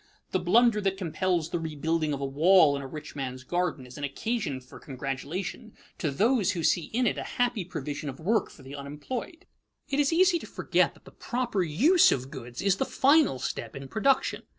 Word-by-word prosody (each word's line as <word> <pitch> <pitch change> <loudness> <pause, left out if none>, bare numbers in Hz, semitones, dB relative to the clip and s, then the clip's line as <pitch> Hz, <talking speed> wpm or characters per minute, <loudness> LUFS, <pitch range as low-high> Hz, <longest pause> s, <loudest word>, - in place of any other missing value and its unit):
The - - +1
blunder 235 -3 +4
that 195 -1 0
compels 175 -2 -1
the 175 - -1
rebuilding 160 0 -1
of 140 - -2
a 140 - -2
wall 155 +2 +5
in 140 - -4
a 135 - -6
rich 150 +3 -9
man's 130 -2 -5
garden 175 -3 -2
is 125 +3 -11
an - - -6
occasion 155 - -2
for 130 0 -14
congratulation 150 - -5 0.3
to 155 - 0
those 205 - +2
who 170 -3 -3
see 170 +1 +2
in 245 +2 -1
it - - 0
a - - -7
happy 245 -5 +1
provision 150 -4 -5
of 135 - -8
work 215 +8 +1
for 140 - -15
the 135 +2 -9
unemployed. 190 - -6 0.4
It 280 - 0
is 285 +1 +3
easy 355 +1 +4
to - - -10
forget - - +1
that - - -22
the - - -13
proper 240 -5 -2
use 250 - +5
of 130 +1 -2
goods 125 -1 -7
is 195 -1 +3
the - - +1
final 280 - +4
step 115 -2 -5
in 135 0 -7
production. 260 - +1
170 Hz, 205 wpm, -28 LUFS, 140-230 Hz, 0.4 s, wall